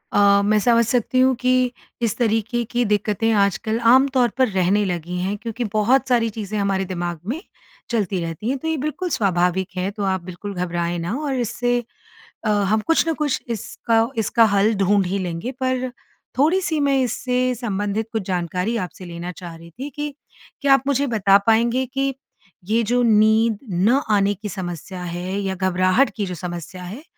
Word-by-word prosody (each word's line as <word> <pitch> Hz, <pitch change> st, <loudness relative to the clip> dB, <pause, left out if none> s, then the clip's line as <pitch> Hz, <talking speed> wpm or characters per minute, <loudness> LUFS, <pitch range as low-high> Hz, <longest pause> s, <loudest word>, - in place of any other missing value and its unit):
अ, 200 Hz, 0 st, +5 dB
मैं 215 Hz, +1 st, +3 dB
समझ 235 Hz, +1 st, +4 dB
सकती 245 Hz, +1 st, +1 dB
हूँ, 260 Hz, +1 st, +5 dB
कि 255 Hz, 0 st, +2 dB, 0.3 s
इस 230 Hz, -3 st, 0 dB
तरीके 225 Hz, 0 st, 0 dB
की 245 Hz, 0 st, +1 dB
दिक्कतें 210 Hz, +2 st, +1 dB
आजकल 215 Hz, +2 st, +1 dB
आम 265 Hz, +2 st, +6 dB
तौर 245 Hz, -2 st, +4 dB
पर 260 Hz, -, +4 dB
रहने 190 Hz, +2 st, +2 dB
लगी 175 Hz, 0 st, -3 dB
हैं। 195 Hz, +3 st, -1 dB
क्योंकि 230 Hz, +2 st, -4 dB
बहुत 250 Hz, +6 st, +3 dB
सारी 230 Hz, -2 st, +3 dB
चीज़ें 215 Hz, -1 st, -5 dB
हमारे 195 Hz, -1 st, 0 dB
दिमाग 175 Hz, -2 st, -4 dB
में 300 Hz, +9 st, -3 dB, 0.5 s
चलती 200 Hz, -5 st, 0 dB
रहती 165 Hz, +8 st, -4 dB
हैं, 270 Hz, -, 0 dB
तो 320 Hz, -, -6 dB
ये 320 Hz, -, +1 dB
बिल्कुल 305 Hz, +6 st, -3 dB
स्वाभाविक 185 Hz, -, +1 dB
है। 185 Hz, +1 st, 0 dB
तो 205 Hz, 0 st, -5 dB
आप 190 Hz, -2 st, 0 dB
बिल्कुल 185 Hz, +3 st, -7 dB
घबराए 175 Hz, -1 st, -2 dB
ना 170 Hz, +6 st, -3 dB
और 285 Hz, -3 st, -2 dB
इससे 245 Hz, +1 st, 0 dB, 0.7 s
अ, -, -, +1 dB
हम 210 Hz, +1 st, +2 dB
कुछ 330 Hz, 0 st, +3 dB
न -, -, +2 dB
कुछ 295 Hz, -3 st, -1 dB
इसका 230 Hz, +1 st, 0 dB
इसका 225 Hz, +1 st, +3 dB
हल 210 Hz, +3 st, +3 dB
ढूँढ 195 Hz, 0 st, +2 dB
ही 195 Hz, +2 st, -1 dB
लेंगे। 180 Hz, +6 st, -4 dB
पर, 255 Hz, 0 st, 0 dB, 0.5 s
थोड़ी-सी 320 Hz, +2 st, +2 dB
मैं 280 Hz, -1 st, +2 dB
इससे 250 Hz, +1 st, 0 dB
संबंधित 210 Hz, -1 st, -2 dB
कुछ 220 Hz, -3 st, -1 dB
जानकारी 180 Hz, +5 st, -1 dB
आपसे 185 Hz, -1 st, -6 dB
लेना 175 Hz, +1 st, -6 dB
चाह 175 Hz, -2 st, -9 dB
रही 170 Hz, +1 st, -13 dB
थी, 265 Hz, -, -7 dB
कि 295 Hz, +1 st, -5 dB, 0.5 s
क्या 280 Hz, -1 st, +5 dB
आप 270 Hz, -, +3 dB
मुझे 280 Hz, 0 st, +1 dB
बता 200 Hz, -4 st, +4 dB
पाएँगे, 235 Hz, +3 st, +3 dB
कि 270 Hz, +1 st, -1 dB, 0.5 s
ये 225 Hz, +3 st, +2 dB
जो 245 Hz, +3 st, +1 dB
नींद 220 Hz, 0 st, +4 dB
न 210 Hz, +10 st, +3 dB
आने 200 Hz, -1 st, +3 dB
की 210 Hz, +2 st, -7 dB
समस्या 180 Hz, -1 st, -6 dB
है 180 Hz, +3 st, -4 dB
या 190 Hz, -1 st, -2 dB
घबराहट 185 Hz, +6 st, +2 dB
की 210 Hz, -, -2 dB
जो 180 Hz, -2 st, -5 dB
समस्या 175 Hz, +2 st, -7 dB
है, 205 Hz, -, -8 dB
215 Hz, 185 wpm, -21 LUFS, 185-245 Hz, 0.7 s, आम